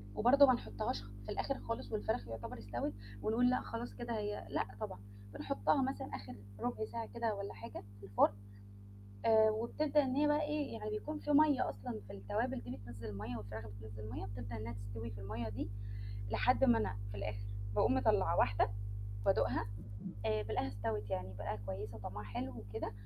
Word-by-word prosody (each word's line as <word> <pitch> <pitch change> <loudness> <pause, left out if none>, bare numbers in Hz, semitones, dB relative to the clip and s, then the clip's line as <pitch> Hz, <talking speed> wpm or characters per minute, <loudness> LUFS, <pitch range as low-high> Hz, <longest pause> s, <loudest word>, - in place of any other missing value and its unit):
وبرضه 280 +5 +8
ما 255 - +7
نحطهاش 100 - -2 0.2
في - - -9
الآخر 275 - -1
خالص 230 - -4
والفراخ 220 - 0
يعتبر 115 0 -5
استوت، 100 -1 -2 0.3
ونقُول 240 +3 +4
لأ 255 - +3
خلاص 235 +1 -4
كده 235 -1 -3
هي 210 0 -2
لأ - - +1
طبعًا، 100 - -4 0.3
بنحطها 100 - +2
مثلًا 270 +1 -1
آخر 120 +5 -7 0.2
رُبع 240 -3 -1
ساعة 230 +1 -4
كده 230 -2 0
والّا 200 0 -4
حاجة 105 +1 -7 0.2
في 100 - -10
الفرن، 100 +1 +5 0.9
آآ 220 -1 +7
وبتبدأ 285 +7 +2
إن 260 0 0
هي 295 - +5
بقى 295 +1 +4
إيه 300 -1 0
يعني 430 0 -2
يكون 305 -7 -3
في 295 - -4
مَيّة 295 -2 +6
أصلًا 105 +1 -5
في 100 - -8
التوابل 100 +4 -1
دي 120 -1 -5
بتنزّل 110 +2 -8
المَيّه، 105 +4 -4
والفراخ 110 +1 -6
بتنزّل 105 +1 -7
مَيّه، - - -3
بتبدأ 100 +2 -5
إنها 110 +1 -4
تستوي 100 +2 -5
في 100 -1 -7
المَيّه 110 +3 -3
دي، 100 -1 -3 0.6
لحد 110 0 +4
ما 115 -1 +7
أنا 105 -2 0
في 100 - -5
الآخر 100 0 -3 0.3
باقوم - - +5
مطلّعة - - +4
واحدة 100 +1 +4 0.6
بادوقها 110 0 +3 0.6
آآ 110 -1 +2
بالقاها 105 -3 0
استوت 105 +1 -2
يعني 95 0 -2
بالقاها 105 +1 -3
كويسة 100 +2 -4
وطعمها 105 0 -5
حلو 100 -4 -3
وكده، 110 +1 -4
110 Hz, 180 wpm, -37 LUFS, -, 0.9 s, وبرضه